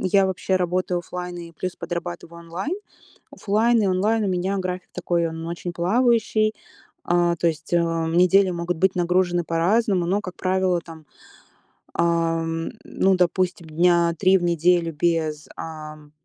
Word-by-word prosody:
я 190 +1 +3
вообще 190 0 0
работаю 180 0 0
офлайн 180 +1 -6
и 170 -1 -9
плюс 185 +3 -5
подрабатываю 170 0 -6
онлайн. 170 - -5 0.6
Офлайн 225 +3 +2
и 200 - +2
онлайн 210 +4 +1
у - - 0
меня 185 +2 -1
график 185 -1 -4
такой, 170 -1 0
он 165 0 -6
очень 170 +1 -5
плавающий, 215 +3 +2 0.5
а, 175 0 +2
то 170 - -1
есть, 160 0 -2
а, 165 -1 +1
недели 185 +3 +4
могут 170 0 -2
быть 190 +3 +2
нагружены 175 0 +1
по-разному. 180 +3 +1
Но, 195 +3 +1
как 185 -3 -8
правило, 185 -1 +1
там, 160 -2 -13 0.9
ам, 165 -1 0
ну, 190 0 +1
допустим, 180 -1 0
дня 170 +1 +3
3 190 0 +5
в 175 - -4
неделю 170 0 +2
без, 155 -1 -1
ам, 155 -2 -9
175 Hz, 150 wpm, -23 LUFS, 165-185 Hz, 0.9 s, 3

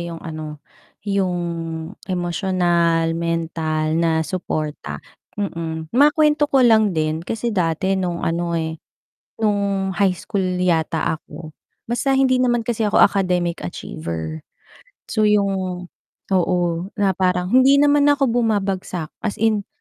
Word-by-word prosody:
yung 170 -1 -5
ano, 155 -2 -7 0.4
yung 195 -3 0 0.7
emotional, 175 -2 +1
mental 165 -2 -1
na 160 -1 +1
suporta, 155 -4 -4 0.3
mm. 165 -5 -4
Makuwento 295 +2 +4
ko 270 -3 +4
lang 220 -6 +4
din 155 0 0
kasi 225 +6 -3
dati 180 0 0
nung 180 -3 -2
ano, 170 0 -1
eh, 160 -1 -3 0.6
nung 200 -2 +1
high 195 -1 +3
school 190 +1 -3 0.2
yata 160 -2 +1
ako, 155 +1 -11 0.4
basta 270 +3 +1
hindi 265 -1 +3
naman 245 -2 +2
kasi 225 -1 -1
ako 205 - +3
academic 180 - +2
achiever. 80 -2 -6 0.7
So 215 -1 +2
'yong 190 -3 0 0.4
oo, 180 -1 +2 0.4
na 200 -2 +2
parang 180 0 0
hindi 260 +2 +6
naman 290 0 +4
ako 275 -4 +3
bumabagsak 195 -8 -1
as 210 - -3
in 215 -2 0
185 Hz, 120 wpm, -21 LUFS, 165-215 Hz, 0.7 s, hindi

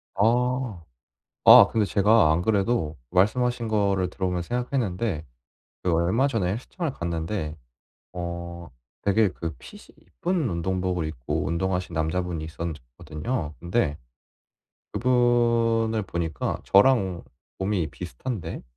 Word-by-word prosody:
아. 120 -1 +1 0.6
아 - - +10
근데 110 -2 +2
제가 105 -4 +4
안 80 +2 +2
그래도 100 -5 0
말씀하신 120 +5 +2
거를 100 -4 +1
들어보면서 90 -2 -2
생각했는데 115 - -1 0.6
그 90 - +1
얼마 90 +11 +2
전에 110 -10 0
헬스장을 145 - -4
갔는데 85 -2 -3 0.6
어 85 -1 -6 0.3
되게 100 +1 +3
그 85 -3 -6
핏이 - - -12 0.2
이쁜 175 -6 -2
운동복을 90 -1 -1
입고 65 -7 -3
운동하시는 90 +1 -1
남자분이 80 +1 -1
있었 80 +2 -5 0.3
거든요. 80 - -4
근데 85 -4 0 1.0
그분을 115 -2 +2
보니까 85 -4 -3
저랑 100 -4 +4 0.4
몸이 95 -4 0
비슷한데 90 - -6
95 Hz, 260 characters per minute, -25 LUFS, 85-115 Hz, 1.0 s, 아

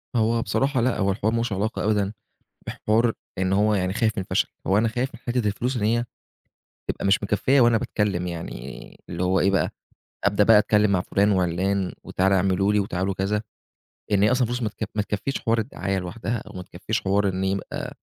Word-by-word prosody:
هو 115 +1 +2
بصراحة 135 +1 0
لأ، 125 +1 +1
هو 100 -1 +1
الحوار 110 +2 0
ما - - +1
لهوش 115 -3 -1
علاقة 105 +4 -2
أبدًا 105 -1 +1 0.5
بحوار 115 +2 +1 0.3
إن 95 0 0
هو 105 +2 +3
يعني 95 -1 0
خايف 110 +1 +1
من - - 0
الفشل. - - 0 0.2
هو 95 +2 +3
أنا 115 - +2
خايف 125 +4 -2
من - - -11
حتّة 120 -2 -1
الفلوس 120 +5 -1
إن 105 - -2
هي 120 +3 +2 0.9
تبقى - - -3
مش 100 - +3
مكفّية 120 +7 +2
وأنا 120 -1 +5
باتكلّم 95 -5 -1
يعني 75 -7 -7
اللي 85 +1 -4
هو 95 +1 +2
إيه 100 - +3
بقى، 95 - +1 0.5
أبدأ 100 0 +3
بقى 110 0 +7
أتكلّم 105 0 +3
مع 95 - +2
فُلان 100 +2 +2
وعِلّان 95 +1 0
وتعالوا 95 +1 +2
اعملوا 95 +2 +2
لي 105 - +3
وتعالوا 95 0 -2
كذا، 100 +3 -1 0.7
لإن 100 -1 +3
هي 105 - +5
أصلًا 125 -2 +2
فلوس 120 +1 -3
ما 110 - +1
تك 105 0 -6
ما 105 - +1
تكفّيش 105 +6 -3
حوار 115 -1 +1
الدعاية 100 -4 -2
لوحدها 90 +5 -3
أو 105 - -11
ما 90 - -5
تكفّيش 100 +6 -3
حوار 100 +1 +1
إن 95 0 -2
يبقى 95 0 -3
105 Hz, 205 wpm, -24 LUFS, 95-115 Hz, 0.9 s, بقى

